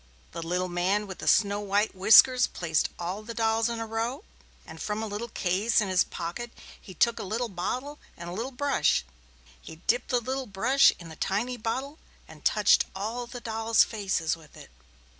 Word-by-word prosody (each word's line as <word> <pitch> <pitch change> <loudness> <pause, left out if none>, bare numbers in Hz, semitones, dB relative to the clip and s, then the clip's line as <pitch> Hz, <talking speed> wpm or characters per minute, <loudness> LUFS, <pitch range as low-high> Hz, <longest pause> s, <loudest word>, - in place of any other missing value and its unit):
The - - -6
little 180 +2 -1
man 185 +4 0
with 190 -2 -9
the - - -7
snow 205 -1 +3
white 205 +1 0
whiskers 225 +6 +6
placed 160 -3 -1
all 180 +4 -4
the 230 +2 -8
dolls 225 0 +1
in 230 -1 -4
a 225 - -3
row 230 - -3 0.4
and 160 0 -11
from 210 +1 -3
a - - -2
little 215 +2 -5
case 205 +2 +1
in 210 -3 0
his 185 -1 +4
pocket 175 +8 -6 0.3
he 185 - -12
took 235 +6 +2
a - - -3
tiny 235 +4 -1
bottle 250 +11 -4 0.2
and 170 - -8
a 175 - -6
little 230 +7 -3
brush. 275 - +1 0.6
He 160 - -10
dipped 240 +9 -1
the 250 - +2
little 260 +2 -4
brush 230 +8 +4
in 170 -2 -11
the 160 - -10
tiny 225 +10 -1
bottle 260 +6 -4 0.3
and - - -15
touched - - +4
all 225 +5 -4
the 245 0 -8
dolls' 225 0 +2
faces 190 -7 -1
with 160 -2 -17
it. - - -13
215 Hz, 195 wpm, -27 LUFS, 185-240 Hz, 0.6 s, whiskers